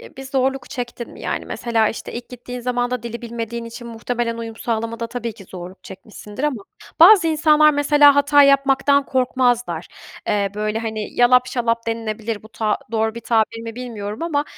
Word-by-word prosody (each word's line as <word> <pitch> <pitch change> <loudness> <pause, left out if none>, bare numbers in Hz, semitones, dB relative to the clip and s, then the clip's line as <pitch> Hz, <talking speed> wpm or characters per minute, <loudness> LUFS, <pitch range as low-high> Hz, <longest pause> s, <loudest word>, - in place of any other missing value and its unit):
e, - - -14
bir 270 - -7
zorluk 265 0 -1
çektin 240 -1 -6
mi - - -13
yani? - - -3
Mesela, 225 -2 0
işte, - - -6
ilk 240 +1 -7
gittiğin 250 0 -8
zamanda 245 0 -1
dili 235 0 -6
bilmediğin 235 0 -5
için 230 +1 -9
muhtemelen 230 0 -3
uyum 225 -1 -6
sağlamada 230 0 -3
tabii 235 -1 -5
ki 200 - -14
zorluk 180 +1 -10
çekmişsindir. 205 +5 -8
Ama 260 -9 -1 0.4
bazı 360 0 +8
insanlar 305 -1 +5
mesela 290 0 +5
hata 285 0 +5
yapmaktan 275 0 +3
korkmazlar. 245 -9 0 0.4
Eee, 200 -1 +1
böyle 215 +1 -2
hani 220 -2 -4
yalap 250 +1 +5
şalap 230 -2 -1
denilebilir. 225 -1 -3
Bu 220 - -14
ta 215 -2 -1
doğru 220 0 0
bir 235 - -6
tabir 230 0 0
mi 225 -1 -7
bilmiyorum 220 -1 -6
ama, 295 -4 0
235 Hz, 175 wpm, -20 LUFS, 225-265 Hz, 0.4 s, bazı